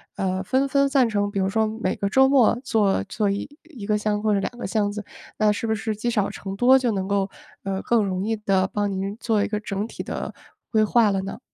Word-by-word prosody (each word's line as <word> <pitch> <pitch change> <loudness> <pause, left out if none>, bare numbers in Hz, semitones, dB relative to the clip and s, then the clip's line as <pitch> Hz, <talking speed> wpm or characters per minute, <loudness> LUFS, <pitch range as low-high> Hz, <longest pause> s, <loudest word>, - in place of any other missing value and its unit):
呃， 185 -1 -1
分 260 +8 +1
分 280 +1 +3
散 270 -4 +3
成 205 -2 0
比 205 - -5
如 190 0 +1
说 220 +2 +1
每 215 -3 -2
个 200 - -1
周 265 +5 +5
末 255 -5 +4
做 205 - +1
做 210 -2 0
1 275 +4 -6
个 210 0 +1
箱 210 0 0
子 - - -13
或 215 -1 +2
者 200 - +2
2 195 - -2
个 - - -5
箱 210 -3 0
子， 210 +1 -5 0.3
那 215 -1 +3
是 210 +2 -3
不 220 - +1
是 215 +1 -3
积 240 +3 -1
少 210 -4 +1
成 195 0 -6
多， 255 +5 +5
就 250 -3 0
能 190 -3 -2
够， 200 -1 +1 0.3
呃， 195 -1 -2
更 230 -3 +2
容 185 -1 -2
易 225 0 -1
地 195 -3 +1
帮 205 -1 0
您 195 +1 -3
做 220 -3 +1
一 - - -2
个 210 -1 -1
整 205 -1 -3
体 230 - -7
的 - - -5 0.4
规 220 - +3
划 215 0 +4
了 195 -1 0
呢？ 195 - -6
210 Hz, 260 characters per minute, -23 LUFS, 200-230 Hz, 0.4 s, 周